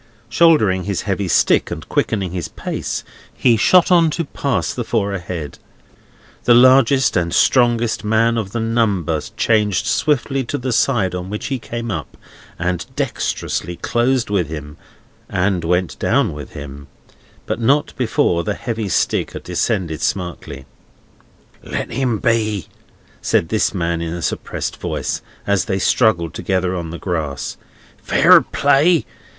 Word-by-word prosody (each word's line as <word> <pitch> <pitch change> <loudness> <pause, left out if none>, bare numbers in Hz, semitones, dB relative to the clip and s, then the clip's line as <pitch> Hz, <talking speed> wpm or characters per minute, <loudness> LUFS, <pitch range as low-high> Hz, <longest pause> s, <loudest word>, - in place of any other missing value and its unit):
Shouldering 110 - +3
his 100 -3 -2
heavy 100 -1 -2
stick, - - +3
and - - -7
quickening 100 -5 -1
his 90 -2 -4
pace, - - -4 0.3
he 120 -2 +3
shot 180 - +4
on 170 -2 +5
to 170 - -1
pass 140 -3 -2
the 120 - -3
four 105 -3 -1
ahead. 85 -6 -6 0.9
The 120 - +6
largest 130 +1 +5
and 85 -2 0
strongest 120 -1 +2
man 115 +2 +2
of 110 -4 -3
the 115 - -3
number 105 -9 0 0.2
changed 105 -4 +2
swiftly 135 +2 0
to 145 - -3
the 130 0 -3
side 105 -4 +1
on 90 +1 -5
which 105 +1 -5
he 135 -2 -2
came 115 0 -5
up, 80 -6 -6 0.4
and 90 0 -1
dexterously 90 - -2
closed 120 +3 0
with 95 -6 +1
him 75 -1 -7 0.5
and 90 -1 0
went 90 +1 -1
down - - +1
with 75 -2 -9
him; 70 -1 -9 0.6
but - - -3
not 140 +6 +2
before 110 -8 +1
the 105 -1 -2
heavy 115 -4 -4
stick - - 0
had - - -7
descended 80 -4 -1
smartly. 80 -7 -4 1.0
"Let - - -5
him 125 -2 0
be!" 110 - 0 0.6
said 80 - +1
this 110 -2 +1
man 85 -3 -2
in 85 0 -3
a 85 - -6
suppressed - - -3
voice, - - -3 0.2
as 100 -1 +1
they 95 - -1
struggled 95 -4 +2
together 95 0 -1
on 85 -2 -4
the 85 - -6
grass. 80 -7 -3 0.5
"Fair - - +6
play! 145 +4 +2
100 Hz, 145 wpm, -19 LUFS, 85-120 Hz, 1.0 s, The